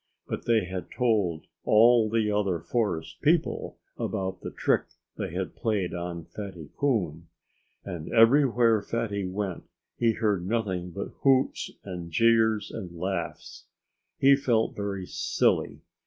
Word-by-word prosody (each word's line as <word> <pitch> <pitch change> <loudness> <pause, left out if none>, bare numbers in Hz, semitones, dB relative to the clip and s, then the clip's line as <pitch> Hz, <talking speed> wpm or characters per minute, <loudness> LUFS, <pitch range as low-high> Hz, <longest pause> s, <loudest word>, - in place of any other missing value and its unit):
But - - -5
they 115 -4 +3
had 95 0 -6
told 105 -10 0 0.2
all 115 +1 +5
the 110 -1 +1
other 100 -4 0
forest 85 -1 -2
people - - +1 0.2
about 95 -1 -3
the - - -5
trick - - +1 0.3
they - - -4
had - - -4
played 105 -5 -1
on 85 -1 -5
Fatty 95 -8 -8
Coon. 90 - -1 0.6
And 85 -3 -6
everywhere 115 -2 +5
Fatty 100 -4 -2
went 95 -1 -4 0.3
he 115 -1 +3
heard 105 -5 0
nothing 95 -4 -1
but 100 +3 -5
hoots 135 -1 +2
and 90 -3 -6
jeers 110 +1 +3
and 90 -6 -7
laughs. 90 0 -4 0.5
He 140 +1 +6
felt 120 -5 +1
very 100 -2 -3
silly. - - 0
105 Hz, 130 wpm, -27 LUFS, 90-115 Hz, 0.6 s, He